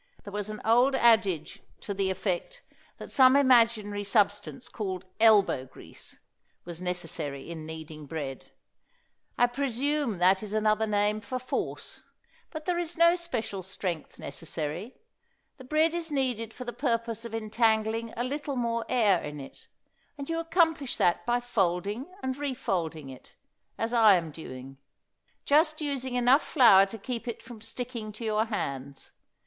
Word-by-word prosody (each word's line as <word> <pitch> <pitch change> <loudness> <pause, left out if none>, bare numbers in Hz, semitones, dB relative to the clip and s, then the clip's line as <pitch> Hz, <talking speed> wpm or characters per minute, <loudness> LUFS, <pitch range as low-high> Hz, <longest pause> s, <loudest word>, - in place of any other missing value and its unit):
There 200 - -9
was 205 0 -3
an 215 0 -6
old 245 +5 +4
adage 200 - +2 0.2
to 200 - -4
the 195 -1 0
effect 190 - -3 0.3
that - - -9
some 260 0 +6
imaginary 230 -6 +4
substance 205 +4 0
called 190 -5 -5
"elbow 205 - +4
grease" - - -13 0.5
was 170 0 -8
necessary 170 -5 -3
in 160 -2 -7
kneading 155 -2 -8
bread. 140 -3 -6 0.9
I 245 - +5
presume 270 -1 -1
that 185 +2 +4
is 215 0 -5
another 215 0 +2
name 210 0 +1
for 255 +5 -4
force. 255 0 -4 0.5
But 310 -2 -7
there 355 -1 0
is 345 -1 -4
no 335 +1 +6
special 245 - -4
strength 180 -3 -5
necessary. 160 - -4 0.6
The 260 - -12
bread 310 +4 +2
is 340 -1 -2
kneaded 250 -6 -1
for 250 +2 -9
the 240 - -5
purpose 230 -4 -1
of 230 -1 -6
entangling 220 0 0
a 240 - 0
little 285 +2 -3
more 235 -2 -1
air 210 -8 +3
in 150 0 -6
it, 135 - -12 0.5
and 280 -1 -6
you 330 0 -1
accomplish 325 -4 +1
that 175 +5 +1
by 240 0 +2
folding 205 0 -1 0.2
and 260 0 -1
refolding 175 - -3
it, 130 - -15 0.4
as 225 +1 -2
I 220 -4 +7
am 165 -3 -2
doing; 135 -3 -10 0.7
just 310 +2 +3
using 270 -4 -3
enough 250 +4 +5
flour 200 - +6
to 225 - -8
keep 240 +2 -5
it 235 - -5
from 235 -3 -11
sticking 235 -2 -6
to 225 +2 -7
your 215 0 +1
hands. 140 - -5
220 Hz, 155 wpm, -28 LUFS, 190-255 Hz, 0.9 s, I